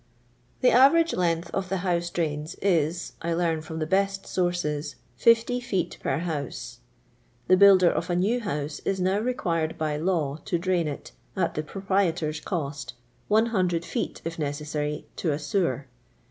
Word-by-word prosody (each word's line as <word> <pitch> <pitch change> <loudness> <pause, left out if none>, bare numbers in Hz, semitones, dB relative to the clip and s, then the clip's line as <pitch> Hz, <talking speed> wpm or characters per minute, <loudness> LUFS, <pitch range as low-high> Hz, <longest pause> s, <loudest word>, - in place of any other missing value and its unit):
The 255 - +5
average 320 +7 +5
length 170 -1 0
of 190 -1 -2
the 190 -1 -1
houso 175 -1 0
drains 155 -2 -2
i*. - - +2 0.6
I - - +1
Ifarn 165 -2 0
from 160 0 -7
the 155 - -1
beAt 195 +3 0
sources, 175 -5 -1 0.2
50 230 +2 +4
feot 185 -8 -2
\wr 140 - 0
huuse. 155 -6 -4 0.7
The 185 - +6
builder 190 -2 +7
of - - -2
a 175 - +1
new 205 +8 +2
house 150 -9 -3
is 195 -1 -1
now 190 +2 +2
r« 250 +1 0
quiriMi 165 -8 -1
by 155 -1 -1
law 155 -4 0
to 175 - 0
dniiii 175 -1 0
it, 145 - -6 0.3
at 180 -3 +1
the 155 - -1
proprietor's 175 -3 -1
coiti, 145 -6 -4 0.3
100 195 -6 +2
fee:. - - -3
if 165 0 -4
neafi'Sary, 150 0 -3
to 160 -5 0
a - - -1
sewer. 150 - -1
175 Hz, 160 wpm, -26 LUFS, 155-195 Hz, 0.7 s, builder